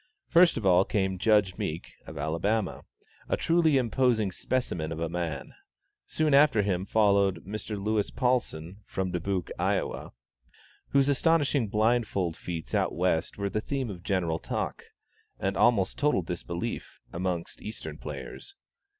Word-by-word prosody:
First 170 -2 +5
of 110 - -3
all 90 0 +6
came 95 -2 -1
Judge 105 -3 +3
Meek, 80 +2 -4 0.2
of - - -8
Alabama, 85 +7 -1 0.4
a - - +1
truly 165 -3 +3
imposing 120 -4 +2
specimen 90 -9 -2
of 80 - -4
a 85 - -1
man. 85 -4 -4 0.5
Soon 155 -2 +1
after 140 -7 +5
him 95 -1 -1
followed 100 -4 +3
Mr. 105 +1 -4
Louis 105 +1 0
Paulsen, 100 - -1
from 95 -1 -2
Dubuque, 90 0 -2
Iowa, - - -1 0.8
whose 140 -1 +3
astonishing 145 -3 +2
blindfold 105 -5 +1
feats 85 -2 -6
out - - +1
West 85 -1 0
were 100 0 -1
the 110 - -1
theme 130 -2 -3
of 90 -3 -9
general 85 -4 0
talk, - - -4 0.5
and 95 +1 -1
almost 100 -5 +3
total 145 -11 +2
disbelief, 85 0 -5
amongst 90 -1 -3
Eastern 110 - -7
players. 395 - -7
100 Hz, 140 wpm, -28 LUFS, 90-120 Hz, 0.8 s, all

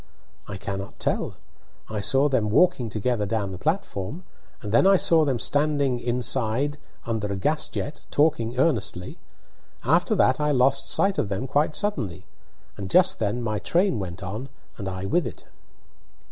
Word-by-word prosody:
"I 100 - -6
cannot 100 0 -6
tell. - - -1 0.5
I 110 -1 -4
saw 135 +8 +3
them 120 -7 +1
walking 125 -1 +3
together 110 0 -1
down 100 -2 -1
the 90 - -7
platform, 155 - -2 0.4
and 105 - -5
then 120 - +5
I 195 0 +6
saw 165 -3 +4
them 135 -4 0
standing 145 0 +1
inside 125 +3 -1 0.3
under 110 -3 -2
a - - -1
gas 150 +11 0
jet, 145 - -5
talking 145 -6 +1
earnestly. 100 - -1 0.6
After 170 - +2
that 130 -8 +3
I 150 0 +1
lost 135 +1 +2
sight 195 0 +3
of 100 - -1
them 100 +6 -2
quite 145 +3 +1
suddenly, 135 - -1 0.5
and 100 -2 -5
just 180 - +4
then 110 +3 -1
my 110 -2 -1
train 175 - +1
went 95 0 -6
on, 110 +9 -5 0.3
and 100 - -5
I 95 0 -5
with 145 - +1
it." - - -10
125 Hz, 160 wpm, -25 LUFS, 105-150 Hz, 0.6 s, I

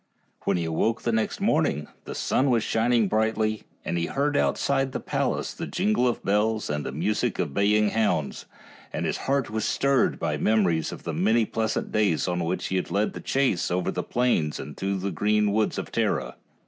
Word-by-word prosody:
When - - +2
he 85 - -1
awoke 110 +8 0
the 120 - +1
next 110 -1 -1
morning 75 +1 +1 0.2
the - - -6
sun 135 +1 +1
was 115 -3 +2
shining 115 -1 +2
brightly, 110 0 0 0.2
and 85 - -1
he 85 - -1
heard 145 +1 0
outside 135 -2 +1
the - - -2
palace - - -1
the - - -5
jingle 110 +4 +1
of 120 - -1
bells 105 0 +1
and 75 -1 -2
the - - -4
music 105 - -1
of 80 -6 -2
baying 105 +2 +3
hounds, 100 -10 0 0.4
and - - -2
his - - -1
heart 140 -5 +1
was 110 0 -1
stirred 140 +2 +2
by - - -1
memories 95 -7 +2
of - - -9
the 85 - -3
many 110 +8 +3
pleasant 110 +1 -2
days 100 -7 +1
on 90 -1 -1
which 85 +3 -2
he 95 - 0
had 90 - -2
led 105 +2 0
the - - -7
chase 130 -10 +1
over 90 0 0
the - - -2
plains 120 -12 0
and 75 +2 -7
through 100 0 -2
the 95 +1 -3
green 105 +1 +2
woods 110 +1 +1
of - - -5
Tara. 65 -2 0
105 Hz, 200 wpm, -26 LUFS, 90-115 Hz, 0.4 s, baying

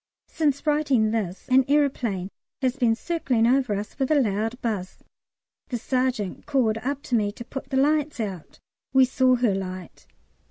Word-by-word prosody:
Since 290 -3 0
writing 280 -8 +2
this 200 -5 -3
an 260 +1 +5
aeroplane 250 -10 0 0.3
has 255 -1 +1
been 240 -5 +2
circling 255 -6 0
over 250 -3 +2
us 205 +7 -6
with 265 - 0
a 310 - +4
loud 225 +1 -1
buzz. 205 -6 -3 0.7
The 245 - -3
sergeant 250 -5 -2
called 235 -6 +1
up 280 +4 -3
to 245 - -1
me 205 -2 +1
to 235 - -9
put 270 +2 -7
the 265 - -1
lights 295 0 +1
out. 195 -7 -5 0.4
We 265 -1 +6
saw 255 0 +3
her 240 -4 +2
light. 185 -2 -6
245 Hz, 165 wpm, -25 LUFS, 215-270 Hz, 0.7 s, We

